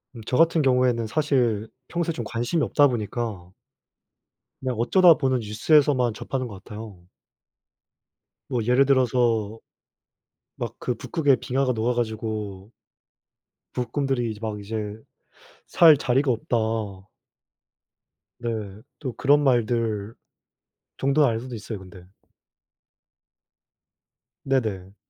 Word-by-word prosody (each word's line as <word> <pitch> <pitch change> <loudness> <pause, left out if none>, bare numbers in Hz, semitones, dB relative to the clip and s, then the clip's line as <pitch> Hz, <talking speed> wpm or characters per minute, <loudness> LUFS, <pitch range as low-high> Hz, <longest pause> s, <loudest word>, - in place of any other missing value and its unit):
음 115 - -8
저 125 - 0
같은 165 0 +4
경우에는 125 -4 +2
사실 120 -6 +1 0.2
평소에 170 -1 -1
좀 120 - -5
관심이 120 +9 -1
없다 145 -1 +4
보니까 110 -6 -4 1.1
그냥 130 -1 -2
어쩌다 175 - +6
보는 130 -4 0
뉴스에서만 125 +3 +2
접하는 130 +3 -4
것 100 -3 -11
같아요. 105 -5 -10 1.4
뭐 120 -3 -1
예를 125 +4 +4
들어서 120 -5 +1 1.0
막 - - -5
그 125 - -2
북극에 145 +2 +1
빙하가 130 0 0
녹아 115 +2 0
가지고 110 -4 -4 1.0
북극곰들이 125 -1 -1
이제 105 - -9
막 110 -2 -4
이제 105 0 -5 0.7
살 160 -4 +7
자리가 135 +1 +1
없다. 120 +1 -1 1.8
네. 120 - -3 0.5
또 130 -5 -4
그런 145 +3 +3
말들 115 -4 0 0.8
정도 140 +2 +3
알고도 120 +2 -3
있어요 105 -1 -6
근데. 90 -1 -14 2.3
네네. 105 -8 -2
120 Hz, 225 characters per minute, -24 LUFS, 110-135 Hz, 2.3 s, 살